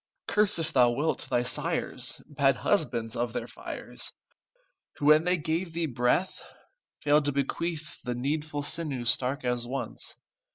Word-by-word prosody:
Curse, 210 -2 +4
if 165 -1 -1
thou 125 -2 +5
wilt, 145 +7 -1
thy 120 - +2
sires, 125 - 0
Bad 140 -2 +2
husbands 125 - 0
of 120 -1 -2
their - - -3
fires, - - -5 0.8
Who, 145 - -4
when 155 +2 +6
they 180 0 +3
gave 165 +2 -2
thee 170 0 -1
breath, 125 +7 0 0.6
Failed 150 0 +4
to 145 - +2
bequeath 150 +3 -3
The 125 -1 -3
needful 145 +3 -2
sinew 145 -5 +1
stark 125 +3 +2
as 120 -1 -1
once. 135 +2 -5
145 Hz, 150 wpm, -28 LUFS, 125-160 Hz, 0.8 s, when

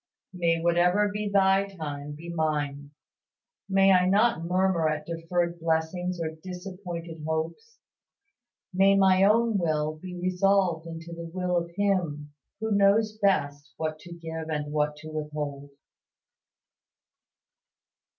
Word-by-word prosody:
May 170 -2 +1
whatever 175 +4 +3
be 210 0 -2
Thy 195 0 +3
time 150 -6 -6
be 160 +3 -10
mine. 145 -3 -2 0.8
May 195 0 +5
I 180 -1 +5
not 205 -3 +3
murmur 180 -2 +2
at 150 0 -3
deferred 170 +1 -2
blessings 165 +2 -1
or 160 -1 -2
disappointed 180 -3 -7
hopes. 160 - -4 1.0
May 195 +2 +5
my 190 -1 +5
own 220 +1 +3
will 155 -2 0
be 180 -1 -7
resolved 185 -2 +1
into 165 0 -8
the 170 0 -7
will 180 0 -1
of 170 -1 0
Him 170 -8 -1 0.3
who 220 0 -2
knows 210 +2 +3
best 145 -7 0
what 155 -1 -3
to 175 +3 -13
give 160 -1 -6
and 150 -1 -3
what 150 0 +1
to 155 +1 -10
withhold. 150 -2 -5
170 Hz, 125 wpm, -27 LUFS, 155-190 Hz, 1.0 s, May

